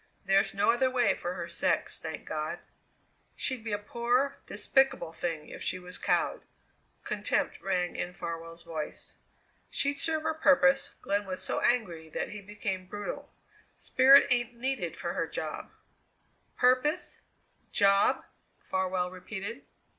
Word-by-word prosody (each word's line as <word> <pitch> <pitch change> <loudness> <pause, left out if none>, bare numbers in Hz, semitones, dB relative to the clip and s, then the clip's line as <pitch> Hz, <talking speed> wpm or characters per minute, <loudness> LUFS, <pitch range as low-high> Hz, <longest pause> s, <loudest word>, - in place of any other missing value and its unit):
There's 195 +1 +3
no 200 - +4
other 260 +2 +2
way 250 -1 +3
for 175 +1 -4
her 170 -2 -4
sex, 170 - 0
thank 160 -1 -6
God!" 155 0 -3 0.8
"She'd 260 -4 -2
be 220 - -4
a 205 - +1
poor, 240 +6 0
despicable 265 - +2
thing 165 -2 -4
if - - -9
she - - -1
was 180 0 -9
cowed." - - +1 0.6
Contempt - - -1
rang 180 -2 0
in 180 0 -3
Farwell's 165 0 -6
voice. 155 -2 -5 0.6
"She'd 280 0 0
serve 315 -1 0
her 320 0 +1
purpose." 275 -3 +4
Glenn 200 0 0
was 185 -1 -4
so - - -1
angry 175 -10 +1
that - - -3
he 210 - -7
became 195 -2 -4
brutal. 205 +1 -6 0.5
"Spirit 270 +2 +7
ain't 240 -1 +2
needed 265 +3 -2
for - - -3
her - - -1
job." - - -5 0.9
"Purpose? 255 +7 +2 0.5
Job?" 200 0 +4 0.3
Farwell 185 -1 -1
repeated. 200 +6 -6
205 Hz, 140 wpm, -30 LUFS, 180-255 Hz, 0.9 s, Spirit